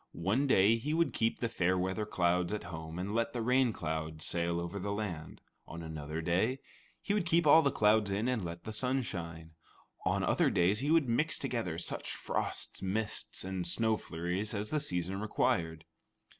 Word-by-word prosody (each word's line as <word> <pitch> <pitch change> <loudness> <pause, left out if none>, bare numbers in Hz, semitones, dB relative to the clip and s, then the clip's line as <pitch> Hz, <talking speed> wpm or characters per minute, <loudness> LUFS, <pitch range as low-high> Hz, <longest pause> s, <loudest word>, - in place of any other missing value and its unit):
One 105 +12 +1
day 110 -2 +5
he 150 +7 -2
would 165 -7 +2
keep 115 0 0
the 120 - +1
fair 95 -5 +1
weather 95 +3 -1
clouds 90 -1 +1
at 105 - -3
home 80 -1 -7
and 95 +3 -3
let 115 0 0
the 120 - -2
rain 125 0 +3
clouds 80 -3 -4
sail 85 0 0
over 85 +4 -4
the 100 +2 -3
land; 100 -7 -4 0.3
on 85 0 -7
another 80 0 -5
day, 95 +10 +1 0.5
he 205 - 0
would 205 -4 0
keep 170 -1 +3
all 155 +2 +8
the 140 - +3
clouds 105 -3 +3
in 100 +4 0
and 125 -5 0
let 85 0 -6
the 110 - -6
sun 130 +4 0
shine; 85 -5 -6 0.5
on - - +1
other - - +3
days 95 +5 +2
he 140 +3 -1
would 160 -4 +4
mix 150 +7 +1
together 115 - -2
such 85 - -3
frosts, - - -3
mists, 105 +3 -2
and 95 -2 -2
snow 110 +5 +2
flurries 90 +4 -3
as 105 +1 -2
the 155 - +2
season 95 - -2
required. 80 -6 0
100 Hz, 190 wpm, -32 LUFS, 85-115 Hz, 0.5 s, all